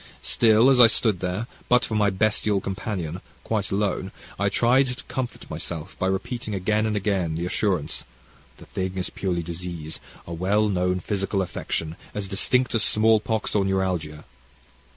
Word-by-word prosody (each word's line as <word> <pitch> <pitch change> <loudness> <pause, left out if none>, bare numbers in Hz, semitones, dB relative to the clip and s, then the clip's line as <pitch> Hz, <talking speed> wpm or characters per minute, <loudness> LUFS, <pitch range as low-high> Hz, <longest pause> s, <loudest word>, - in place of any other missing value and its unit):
Still 115 +3 +5
as 130 - +4
I 120 - +10
stood 110 -4 +2
there, 90 +5 -2 0.2
but 125 0 +4
for - - -5
my 105 -1 +3
bestial 105 +1 +1
companion, 95 -3 -4 0.2
quite 105 -3 -1
alone, 100 -1 -1 0.3
I - - +2
tried 130 +3 +3
to 125 0 -5
comfort 130 -2 -5
myself 80 0 -5
by 95 - +1
repeating 105 +3 -2
again 105 +3 +1
and 110 - -1
again 95 -5 0
the 85 +2 -2
assurance, 90 -4 0 0.5
'the - - -13
thing 95 0 -4
is 90 - -1
purely 90 -3 -2
disease, 85 -2 -6 0.3
a 85 - -6
well 100 +5 +1
known 90 -1 0
physical 100 -1 -1
affection, 80 -2 -4 0.2
as 105 -2 -3
distinctly 120 +6 +2
as - - +5
small 110 +1 +5
pox 110 0 -2
or 105 - +3
neuralgia. 95 -6 -1
95 Hz, 165 wpm, -24 LUFS, 90-110 Hz, 0.5 s, I